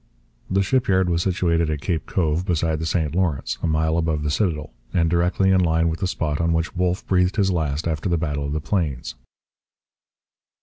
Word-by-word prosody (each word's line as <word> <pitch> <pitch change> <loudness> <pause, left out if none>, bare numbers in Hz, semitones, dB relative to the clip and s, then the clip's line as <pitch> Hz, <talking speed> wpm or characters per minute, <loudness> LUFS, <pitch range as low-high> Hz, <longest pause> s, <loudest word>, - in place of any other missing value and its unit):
The 95 +1 +2
shipyard 95 -5 +2
was 85 0 +1
situated 85 -3 +1
at 75 -2 -2
Cape 80 -6 -2
Cove 80 -1 0
beside 80 -3 0
the 80 - -2
St 80 -3 0
Lawrence, 85 -7 -1
a - - 0
mile 80 +1 +1
above 80 -2 -1
the 75 - -1
citadel, 75 -4 -1 0.2
and 85 -2 +2
directly 90 +2 +2
in 95 -1 +4
line 80 -1 +2
with 80 - -3
the 95 - 0
spot 80 -4 -2
on 85 0 +1
which 80 +1 -1
Wolfe 90 0 0
breathed 90 0 +2
his 95 -2 +2
last 80 -2 -1
after 80 +2 -2
the 85 - +2
Battle 75 -3 -2
of 70 - -3
the 75 - -2
Plains. 75 -11 -2
85 Hz, 200 wpm, -22 LUFS, 80-90 Hz, 0.2 s, in